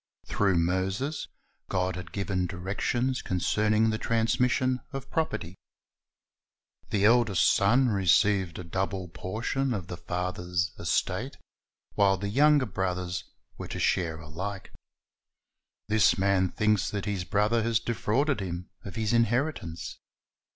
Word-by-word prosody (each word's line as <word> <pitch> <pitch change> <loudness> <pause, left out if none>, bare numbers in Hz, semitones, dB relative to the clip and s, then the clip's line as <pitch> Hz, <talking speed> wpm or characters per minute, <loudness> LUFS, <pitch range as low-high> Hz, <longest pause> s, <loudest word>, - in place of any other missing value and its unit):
Through 95 -3 +1
Moses, 95 - -1 0.4
God 90 -1 0
had 90 -2 -8
given 95 -2 -1
directions 105 +8 -1
concerning 110 +4 +1
the 110 - -2
transmission 125 +3 +1
of 135 -2 -7
property. 155 - -2 1.4
The 100 -1 +2
eldest 110 -8 +4
son 120 +5 +3
received 95 -2 +2
a 90 - -6
double 95 +1 -3
portion 120 +9 -2
of 95 -4 -4
the 90 - -5
father's 90 -2 -2
estate,^ - - -1 0.6
while 100 -1 +3
the 100 +1 -3
younger 145 +4 +4
brothers 90 -3 -3 0.3
were - - -5
to - - -5
share 80 -3 +1
alike. 90 +6 -6 1.2
This 105 0 +4
man 95 -1 +2
thinks 105 0 +1
that 100 -2 -3
his 100 -3 -2
brother 105 +4 +1
has 115 0 +1
defrauded 120 +4 0
him 90 -2 -5
of 100 - -8
his 110 -1 0
inheritance. 115 - 0
100 Hz, 125 wpm, -28 LUFS, 90-115 Hz, 1.4 s, eldest